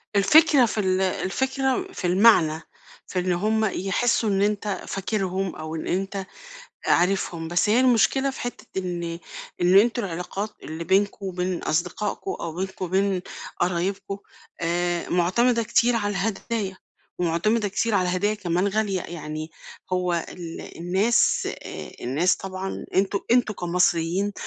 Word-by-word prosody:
الفكرة 280 +6 +6
في 220 - -2
ال 190 -2 +1
الفكرة 265 - 0
في 180 - -2
المعنى، 175 -5 +5 0.5
في 185 - -2
إن 180 0 0
هم 215 +5 +1
يحسّوا 215 +3 +1
إن 195 -1 +1
أنت 205 -1 -1
فاكرهم 195 -2 -2
أو 155 +1 -6
إن 160 - -5
أنت 195 +1 -2 0.6
عارفهم، 175 -2 +1
بس 175 +4 +1
هي 225 +4 +4
المشكلة 260 +2 +3
في 270 - -7
حتّة 245 - -5
إن 170 -2 -4 0.4
إن 180 +2 +6
أنتم 235 +2 +2
العلاقات 185 +4 -4
اللي 160 +2 -5
بينكم 195 +3 +1
وبين 180 -1 -2
أصدقائكم 180 - -1
أو 165 - -5
بينكم 190 0 -3
وبين 190 +1 +1 0.4
قرايبكم، 185 +3 -1 0.4
آآ 175 0 0
معتمدة 230 +7 +2
كتير 240 +2 +3
على 205 -2 0
الهدايا 200 0 -2 0.4
ومعتمدة 190 +6 +1
كتير 210 +2 0
على 180 -2 +2
هدايا 195 +4 +1
كمان 185 -2 0
غالية. 200 -2 0
يعني 155 -2 -6 0.4
هو 180 -1 +1 0.2
ال 170 -2 -8
الناس 190 +7 +2 0.2
آآ - - -7
الناس 150 +9 +2
طبعًا 190 0 -5
أنتم 195 +1 +2
أنتم 240 -3 +3
كمصريين، 175 +2 +1
190 Hz, 135 wpm, -24 LUFS, 175-215 Hz, 0.6 s, الفكرة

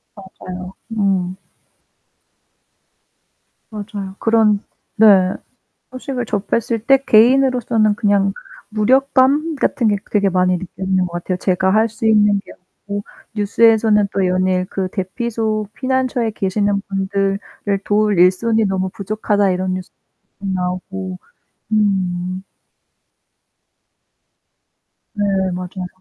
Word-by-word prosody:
맞아요. 185 -1 -9 0.2
음. 190 -4 0 2.3
맞아요. 205 -2 -7
그런 220 -2 +3 0.4
네. 200 -4 +5 0.6
소식을 255 -1 -4
접했을 220 +2 -1
때 270 0 +6
개인으로서는 235 -2 +4
그냥 200 -3 +1 0.4
무력감 265 +7 +2
같은 255 -3 0
게 205 -1 +2
되게 200 -2 +2
많이 180 0 +2
느껴지는 190 +1 -2
것 175 - -8
같아요. 175 +1 -3
제가 190 +1 +1
할 220 +1 +3
수 220 +1 -6
있는 210 -2 +4
게 - - -13
없고 200 +2 -8 0.3
뉴스에서는 215 0 +3
또 195 -2 +1
연일 185 0 +1
그 190 -1 -2
대피소 215 +1 -2
피난처에 255 -2 -1
계시는 200 0 0
분들을 195 0 -1 0.5
도울 210 -2 +2
일손이 215 +5 +3
너무 190 -1 -1
부족하다 205 0 0
이런 185 0 -1
뉴스 185 0 -6 0.5
나오고. 185 0 -4 0.5
음. 185 -3 0 2.7
네 205 - -2 0.3
맞아요. 180 +1 -5
200 Hz, 225 characters per minute, -18 LUFS, 185-220 Hz, 2.7 s, 때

